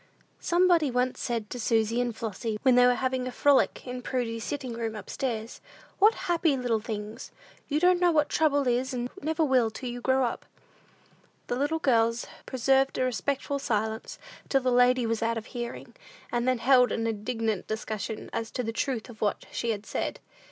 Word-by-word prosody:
Somebody 345 -3 +3
said 250 - -4
once 250 0 0 0.2
to 245 - -6
Susy 225 +1 +1
and 240 -2 -2
Flossy, 220 0 -3
when 260 -2 +5
they 245 0 +6
were 250 - +4
having 255 0 -1
a - - -4
frolic 280 +2 +2
in 250 0 -5
"Prudy's 235 -3 -2
sitting 260 -2 -4
room," 225 -1 -3
up 210 - -8
stairs, 230 -4 -3 0.4
"What 425 +3 +6
happy 335 -5 +2
little 245 -3 0
things! 215 +1 -6 0.4
You 295 +1 0
don't 360 +1 +4
know 355 -1 +4
what 300 -2 +3
trouble 285 -3 +2
is, 255 +2 0
and 245 0 -3
never 320 0 0
will, 255 -5 +3
till 245 +3 -6
you 245 0 -6
grow 260 +1 +2
up!" 235 - -4 1.0
The - - -2
little 290 +5 0
girls 230 -5 +2 0.2
preserved 270 +1 +2
a - - +1
respectful 280 +3 -1
silence, 220 -3 -2 0.3
till 270 - +3
the 255 0 +1
lady 250 0 +4
was 225 0 -1
out 230 0 0
of 225 - -5
hearing, 240 -2 -6 0.4
and 240 +1 0
then 255 -1 +3
held 250 +1 +5
an 225 - -1
indignant 225 -1 -2
discussion 215 -1 -4
as 230 -1 -3
to 250 - -2
the 225 0 -3
truth 245 -1 -2
of 230 -4 -13
what 205 - 0
she 235 - -2
had 210 -2 -2
said. - - -3
245 Hz, 190 wpm, -28 LUFS, 225-270 Hz, 1.0 s, they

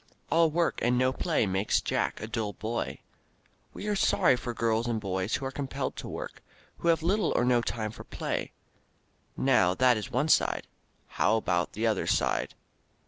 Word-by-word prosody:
"All 165 0 +5
work 170 +2 0
and 125 +1 +2
no 130 +1 +2
play 160 -5 +1
makes 95 +1 +1
Jack - - -1
a - - -3
dull 110 -2 -3
boy." 110 +4 -3 0.7
We - - -8
are 210 -1 0
sorry 130 -8 +4
for 125 0 -4
girls 115 0 0
and 115 -2 0
boys 95 +2 -1
who 135 +1 -4
are 135 - -3
compelled 135 -1 -3
to - - -6
work, - - -7 0.4
who - - -2
have 165 -1 +3
little 200 +5 +2
or 120 - +3
no 125 -1 +3
time 110 -2 -3
for - - -10
play. - - -4 0.9
Now 110 -9 +3
that 125 0 +4
is 105 - -5
one 140 +6 0
side. - - +3 0.4
How 110 - +1
about 90 -5 0
the 110 +2 -2
other 110 -3 +1
side? - - 0
120 Hz, 185 wpm, -29 LUFS, 110-135 Hz, 0.9 s, All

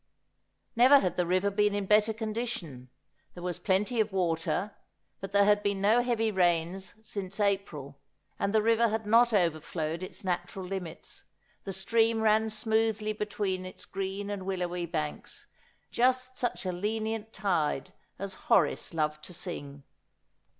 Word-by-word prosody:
Never 255 +4 +8
had 185 -10 0
the 180 -1 0
river 185 +3 +2
been 210 0 +2
in 205 -1 -1
better 210 +2 +4
condition; 215 - -4 0.5
there 175 - -8
was 180 -2 -3
plenty 210 +5 +1
of 215 -1 +2
water, 180 +2 -1 0.4
but 195 0 -6
there 200 0 +5
had 205 0 +4
been 200 -1 0
no 215 +5 +4
heavy 230 -3 +1
rains 180 0 +1
since 195 -2 -5
April, 175 -9 -1 0.4
and 200 - 0
the 215 0 +3
river 230 +1 +4
had 220 0 -2
not 235 +3 +5
overflowed 165 -3 0
its 185 - -7
natural 185 +1 -3
limits; 180 -3 -6 0.4
the 195 - -3
stream 225 +3 +2
ran 220 0 +3
smoothly 220 0 0
between 205 -3 -2
its 185 - -9
green 195 +1 -4
and 195 -2 -5
willowy 180 -2 -2
banks, 155 -3 -5 0.5
just 255 +1 +1
such 245 -5 -2
a 185 - 0
lenient 220 +3 -2
tide 170 -9 -1 0.2
as 195 0 -4 0.2
Horace - - +2
loved 150 -1 -1
to 180 - -9
sing. 145 -6 -6
200 Hz, 150 wpm, -29 LUFS, 180-220 Hz, 0.5 s, Never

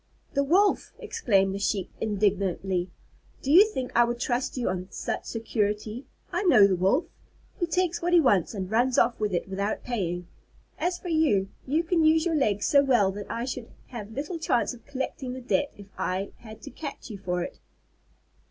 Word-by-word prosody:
"The 280 - +2
Wolf!" 380 +8 +2
exclaimed 195 - +1
the 200 - -4
Sheep 200 -1 -1
indignantly. 195 -3 0 0.5
"Do 275 - 0
you 385 +7 +8
think 255 -9 -4
I 240 - +6
would 240 0 -2
trust 245 +2 -1
you 245 - -1
on 180 0 -2
such - - -4
security? 215 +1 -2 0.2
I 355 0 0
know 255 - +7
the 195 -2 +3
Wolf! 195 - +2 0.5
He 345 - +1
takes 350 +1 0
what 350 +1 0
he 350 - +7
wants 215 - +2
and 190 -1 -4
runs 245 +3 +2
off 235 0 +3
with 210 -1 0
it 175 +1 -1
without 200 +2 -2
paying. 180 -7 -3 0.5
As 355 0 0
for 360 - -7
you, 280 - +2 0.2
you 310 +5 +2
can 335 -1 +2
use 315 +1 +4
your 340 - +1
legs 210 -9 +1
so 280 -1 +5
well 240 -8 +3
that 205 +1 -7
I 235 +1 -2
should 255 -2 -5 0.2
have 220 -3 -7
little 300 +6 -4
chance 255 -5 +1
of 235 -2 -15
collecting 265 -2 -4
the 260 - -6
debt 285 +3 0
if 200 - -11
I 190 +2 -2
had 220 -1 -12
to - - -8
catch 280 -2 -7
you 200 - -7
for 180 -2 -2
it!" - - -8
235 Hz, 195 wpm, -27 LUFS, 200-285 Hz, 0.5 s, you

